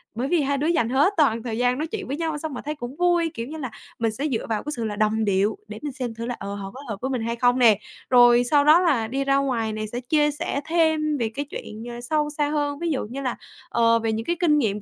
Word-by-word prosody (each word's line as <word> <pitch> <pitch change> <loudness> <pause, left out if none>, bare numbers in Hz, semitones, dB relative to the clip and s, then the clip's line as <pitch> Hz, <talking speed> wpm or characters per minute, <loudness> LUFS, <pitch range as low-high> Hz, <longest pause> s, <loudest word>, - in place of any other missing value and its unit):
Bởi 245 +4 -1
vì 335 +1 +2
hai 280 0 0
đứa 290 +3 0
dành 280 -9 +2
hết 285 +10 +3
toàn 230 -8 +3
thời 225 -2 -3
gian 245 +1 +2
nói 310 +3 -2
chuyện 405 +3 -5
với 275 - -3
nhau, 320 -2 -2
xong 310 0 -5
mà 250 - -5
thấy 300 +1 -3
cũng 255 -2 -7
vui. 345 -2 +2
Kiểu 230 -6 -5
như 315 +3 -7
là, 260 -6 -5 0.3
mình 225 -1 +1
sẽ 275 +8 -2
dựa 245 -6 -2
vào 220 -2 -1
cái 295 - -4
sự 235 - -3
là 210 -1 -3
đồng 215 +1 +1
điệu 200 +1 +1
để 215 0 -8
mình 295 - -4
xem 250 -3 -4
thử 230 +1 -6
là, 245 0 -3
ờ, 200 0 -5
họ 195 -1 -6
có 260 - -10
hợp 210 - -3
với 265 - -2
mình 255 -3 -1
hay 230 +1 -2
không 245 +1 +2
nè. 220 -5 +6 0.3
Rồi 245 -1 +6
sau 285 +4 +3
đó 310 +3 +7
là 285 -11 +2
đi 270 +4 -1
ra 275 0 +2
ngoài 240 -6 0
nè 215 0 -3
sẽ 235 +3 -5
chia 295 +4 +2
sẻ 285 -1 -3
thêm 315 -2 +2
về 230 -4 -1
cái 285 +2 -2
chuyện 215 -5 -7 0.2
sâu 300 +4 0
xa 295 -1 +1
hơn, 290 -1 -1
ví 340 - -1
dụ 275 - -1
như 255 +6 -6
là, 255 -3 -2 0.3
ờ, 230 0 +3
về 225 0 -1
những 225 +1 -3
cái 345 - 0
kinh 310 -4 +4
nghiệm 210 -7 0
255 Hz, 290 wpm, -24 LUFS, 230-300 Hz, 0.3 s, đó